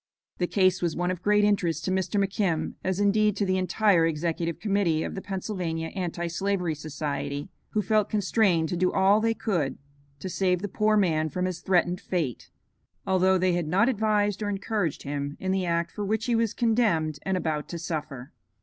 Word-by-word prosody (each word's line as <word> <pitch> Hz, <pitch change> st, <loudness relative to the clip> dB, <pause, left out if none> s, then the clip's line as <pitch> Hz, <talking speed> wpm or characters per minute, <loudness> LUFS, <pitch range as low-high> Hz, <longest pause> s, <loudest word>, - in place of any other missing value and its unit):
The 180 Hz, -, +1 dB
case 185 Hz, -1 st, +2 dB
was 170 Hz, -2 st, 0 dB
one 175 Hz, +1 st, 0 dB
of 180 Hz, -1 st, -5 dB
great 210 Hz, +1 st, +3 dB
interest 200 Hz, -5 st, +1 dB
to 185 Hz, -, 0 dB
Mr. 190 Hz, +2 st, 0 dB
McKim, 195 Hz, -4 st, 0 dB
as 190 Hz, 0 st, -1 dB
indeed 210 Hz, 0 st, +3 dB
to 205 Hz, -, +1 dB
the 185 Hz, 0 st, +1 dB
entire 185 Hz, -1 st, +3 dB
Executive 165 Hz, +1 st, -2 dB
Committee 195 Hz, -7 st, +1 dB
of -, -, -4 dB
the 190 Hz, -, -5 dB
Pennsylvania 180 Hz, -5 st, -3 dB
Anti 175 Hz, -2 st, -3 dB
slavery 180 Hz, 0 st, -1 dB
Society, 145 Hz, 0 st, -4 dB, 0.2 s
who 210 Hz, -, +1 dB
felt 215 Hz, -1 st, +2 dB
constrained 195 Hz, -5 st, +2 dB
to -, -, -1 dB
do 180 Hz, +1 st, +1 dB
all 195 Hz, +2 st, +4 dB
they 225 Hz, 0 st, +1 dB
could 165 Hz, -, -1 dB, 0.4 s
to 145 Hz, -, -6 dB
save 185 Hz, 0 st, 0 dB
the -, -, -1 dB
poor 215 Hz, +2 st, +2 dB
man 160 Hz, -5 st, +2 dB
from 180 Hz, +4 st, -2 dB
his 185 Hz, -2 st, -3 dB
threatened 180 Hz, -1 st, +1 dB
fate, 160 Hz, -, -3 dB, 0.6 s
although 190 Hz, 0 st, +3 dB
they 185 Hz, 0 st, +2 dB
had 175 Hz, -2 st, -1 dB
not 195 Hz, +8 st, +3 dB
advised 210 Hz, -3 st, +1 dB
or 205 Hz, -, -1 dB
encouraged 200 Hz, -4 st, -2 dB
him 145 Hz, 0 st, -4 dB
in 190 Hz, -, -2 dB
the 190 Hz, -1 st, 0 dB
act 170 Hz, 0 st, 0 dB
for 210 Hz, -, -5 dB
which 220 Hz, +3 st, -1 dB
he 245 Hz, -, 0 dB
was 230 Hz, -2 st, +1 dB
condemned 215 Hz, -, +1 dB
and 190 Hz, -1 st, -1 dB
about 155 Hz, -4 st, -2 dB
to 170 Hz, -, -4 dB
suffer. 150 Hz, -5 st, -5 dB
185 Hz, 195 wpm, -26 LUFS, 165-205 Hz, 0.6 s, all